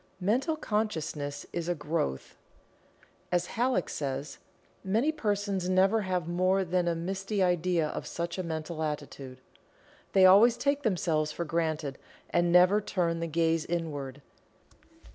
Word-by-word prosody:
Mental 245 - +1
Consciousness 160 - -3
is 170 0 -3
a 175 - +1
growth. 150 - -3 1.0
As 175 0 +1
Halleck 250 +2 +1
says, 140 0 -4 0.4
"Many 225 +10 +1
persons 205 - -1
never 190 +4 +3
have 180 -4 -2
more 185 +2 +1
than 180 0 0
a 170 - +1
misty 195 +4 -2
idea 175 -2 +1
of - - -5
such 170 +2 -4
a - - -1
mental 160 -1 -4
attitude. 140 -4 -5 0.7
They 190 -1 +6
always 215 +6 +7
take 280 0 0
themselves 165 - 0
for 170 +2 -4
granted, 155 -3 -2 0.3
and 175 0 +2
never 180 +4 +6
turn 170 -4 -1
the 165 - -2
gaze 165 0 +1
inward." 145 -6 -4
175 Hz, 135 wpm, -29 LUFS, 160-195 Hz, 1.0 s, always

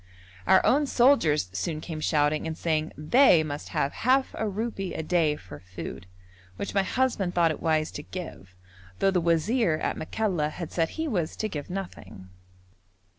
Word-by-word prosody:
Our 190 - +5
own 290 +2 +3
soldiers 235 - +3
soon 155 - -2
came 155 0 -6
shouting 155 0 +1
and 160 0 -4
saying 155 -1 -1
they 170 - +5
must 145 -1 -6
have 140 - -1
half 260 +2 +2
a 220 - -2
rupee 200 -2 -4
a 160 - -3
day 160 -2 +2
for 90 - -11
food, 90 +1 -8 0.5
which 200 - -5
my 195 - +3
husband 205 -4 0
thought 170 -2 +4
it 155 - -6
wise 155 -1 +1
to - - -6
give, 150 - -9 0.4
though 195 - +2
the 180 -2 +1
wazir 170 +4 +2
at 155 - -2
Makalla 175 -4 -1
had 165 +1 -7
said 165 -2 0
he 320 0 -1
was 180 - -1
to 215 - -2
give 150 -8 -6
nothing. 110 - -7
165 Hz, 175 wpm, -27 LUFS, 150-200 Hz, 0.5 s, Our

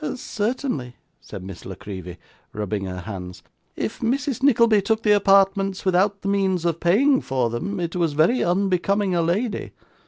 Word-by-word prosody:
'Certainly,' 215 - -3 0.2
said 95 - -9
Miss 95 -2 -9
La 95 - -7
Creevy, 95 -4 -8 0.4
rubbing 105 -1 -3
her 90 -1 -5
hands, 90 -2 -8 0.3
'if - - -4
Mrs. 255 +2 -1
Nickleby 230 -6 +4
took 220 +3 0
the 210 - +3
apartments 195 -1 +3
without 195 +2 +2
the - - -3
means 190 -3 +1
of 170 -1 0
paying 260 +11 +3
for 125 -3 -1
them, 190 - -3
it 170 0 -3
was 170 -4 0
very 160 - +3
unbecoming 195 +2 +1
a 170 - +2
lady. 200 +7 -1
190 Hz, 160 wpm, -23 LUFS, 125-210 Hz, 0.4 s, Nickleby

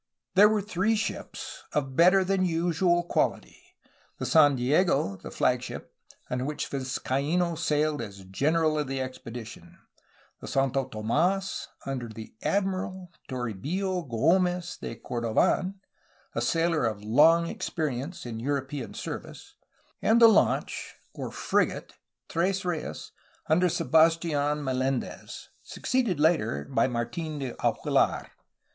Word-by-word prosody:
There 205 +3 +7
were 215 -2 +1
three 205 +2 +1
ships, 220 - -5
of 135 -3 -1
better 185 +4 +6
than 190 0 +1
usual 175 0 +1
quaUty: - - -1 0.6
the - - -4
San 145 -3 +5
Diego 135 - +2
j - - -24
the - - -7
flagship, - - -1 0.3
on 125 +1 -2
which 150 0 -3
Vizcaino 140 +6 -1
sailed 150 -1 0
as 100 -2 -8
''general'' 155 - +1
of 145 - -4
the 135 0 -3
expedition; 125 -3 -8 0.6
the - - -9
Santo 135 -1 0
TomdSy 175 - 0 0.2
under 130 -3 -3
the 110 0 -10
''admiral'' 190 -2 -1 0.2
Toribio 145 - -3
G6mez 175 +8 +1
de - - -6
Corbdn, 120 - 0 0.6
a - - -1
sailor 165 -2 +1
of 105 -2 -2
long 155 +10 +5
experience 155 -2 -4
in 115 -2 -5
European 135 -1 -3
service; - - -7 0.5
and 225 +2 +4
the 230 - +9
launch, 220 -2 +1 0.2
or - - -5
"frigate," - - 0 0.3
Tres 185 +3 0
Reyes 170 -3 -4
j - - -34 0.4
under 175 +4 +4
Sebastidn 160 -3 +2
Mel^ndez, 130 0 -3
succeeded 235 - -1
later 150 - +2
by 115 - +3
Martin 130 +6 -3
de 135 -4 -4
Aguilar. - - +1
155 Hz, 125 wpm, -27 LUFS, 130-180 Hz, 0.6 s, the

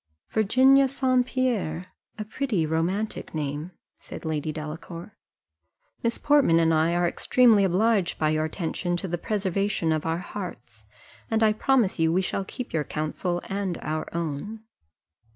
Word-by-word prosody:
"Virginia 260 +6 +5
St. 255 -2 +1
Pierre, 195 -9 -1 0.2
a 215 - -4
pretty 220 - -1
romantic 170 +6 -2
name," 150 +2 -3 0.3
said - - -10
Lady 155 -1 -2
Delacour: 165 +5 -7 0.9
"Miss 235 0 0
Portman 285 - +4
and 165 0 +3
I 160 +2 +2
are 175 0 +2
extremely 225 +2 +4
obliged 195 0 +2
by 155 - +1
your 155 0 +1
attention 175 +2 -2
to 190 - -4
the 175 -1 -3
preservation 195 -4 -1
of 155 0 -1
our 165 +1 0
hearts, 125 - -8 0.4
and 225 0 +2
I 215 -1 +4
promise 230 -5 +1
you 160 0 +3
we 185 +3 +2
shall 195 - -2
keep 245 +5 -7
your 155 -2 +1
counsel 155 +4 -3
and 195 -3 -2
our 155 +1 -3
own." 170 +7 -4
180 Hz, 150 wpm, -26 LUFS, 160-220 Hz, 0.9 s, Virginia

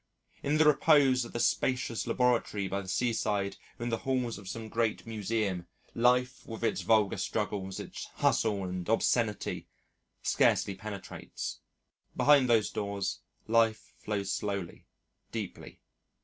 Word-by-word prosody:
In 145 +2 +1
the 155 - +5
repose 140 -4 +5
of - - -10
the 120 - -2
spacious 125 -2 0
laboratory 115 -4 +1
by 100 +1 -2
the 95 - -11
seaside 105 -2 0 0.2
or - - -6
in 120 - -1
the 115 - -1
halls 125 -4 -1
of 95 -2 -9
some 115 +1 -5
great 115 0 -1
Museum, 105 -5 -2 0.3
life 125 +2 +2
with 115 0 -7
its - - +1
vulgar 110 -3 +3
struggles, 100 -3 -2
its - - -7
hustle 105 -3 +2
and 90 0 -4
obscenity, 115 -1 +1 0.6
scarcely 100 - +3
penetrates. 100 0 -6 0.6
Behind 140 -3 +5
those 115 -3 +3
doors, 100 -2 -2 0.3
life 115 -1 +2
flows 100 -2 -2
slowly, 100 -4 -4 0.4
deeply. - - -6
110 Hz, 135 wpm, -30 LUFS, 100-120 Hz, 0.6 s, the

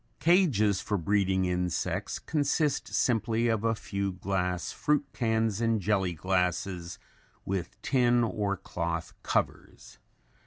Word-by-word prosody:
Cages 135 - +3
for 105 - -1
breeding 95 +1 +1
insects 90 -1 -1
consist 150 -1 0
simply 115 -1 +1
of 110 -1 0
a 115 0 +2
few 100 -2 -3
glass 90 -1 -2
fruit 150 -1 +1
cans 110 -2 0
and 115 -1 +2
jelly 95 -3 +1
glasses 90 0 -1 0.5
with 95 -2 -3
tin 120 -2 +3
or 105 -3 -1
cloth 85 -1 -4
covers. - - -3
100 Hz, 115 wpm, -29 LUFS, 90-115 Hz, 0.5 s, Cages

